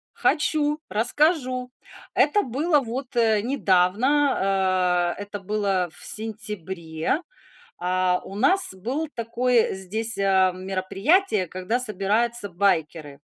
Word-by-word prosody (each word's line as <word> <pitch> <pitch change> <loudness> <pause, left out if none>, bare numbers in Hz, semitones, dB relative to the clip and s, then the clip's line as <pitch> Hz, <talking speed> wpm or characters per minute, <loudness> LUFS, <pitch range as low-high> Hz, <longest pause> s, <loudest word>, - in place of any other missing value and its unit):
Хочу, 300 -1 0
расскажу. 255 +2 0 0.4
Это 415 - +2
было 295 - 0
вот, 255 0 -6
э, 220 -3 +2
недавно, 250 +5 +1 0.8
а, - - -4
это 205 0 -7
было 195 -3 -1
в - - -3
сентябре. 190 - 0 0.6
А, 180 0 0
у 195 - -10
нас 365 - +4
было 255 +12 -4
такое 235 0 0
здесь, 215 +4 0
а, 190 -1 +3
мероприятие, 195 - 0
когда 185 +7 -3
собираются 220 +1 +1
байкеры. 160 -6 -1
215 Hz, 105 wpm, -23 LUFS, 185-255 Hz, 0.8 s, нас